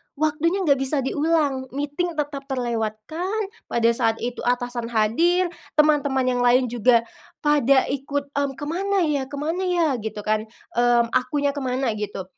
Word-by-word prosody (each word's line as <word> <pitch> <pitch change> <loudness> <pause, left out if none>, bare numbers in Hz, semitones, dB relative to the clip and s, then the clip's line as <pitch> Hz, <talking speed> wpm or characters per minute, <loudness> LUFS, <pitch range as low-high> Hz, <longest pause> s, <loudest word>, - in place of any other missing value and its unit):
waktunya 310 +6 0
enggak 280 -4 +3
bisa 270 +1 0
diulang. 290 -2 0
Meeting 295 +4 -2
tetap 285 -2 -4
terlewatkan. 250 - -2 0.2
Pada 235 0 +2
saat 230 -1 +1
itu 245 +1 -3
atasan 245 -1 -1
hadir, 330 +12 +2 0.2
teman-teman 295 -3 +3
yang 250 -1 0
lain 245 0 +3
juga 240 0 +4 0.4
pada 280 -3 +4
ikut, 280 +1 -3
"Mhm, 280 -1 -1
kemana 365 +7 -1
ya? 285 -4 0
Kemana 315 +6 -2
ya?" 350 -2 +2
gitu 215 -1 -5
kan. 215 +1 0 0.3
Mmm, 240 -1 +3
akunya 285 +3 +1
kemana 260 -3 -1
gitu. 210 -2 -4
275 Hz, 140 wpm, -23 LUFS, 240-300 Hz, 0.4 s, juga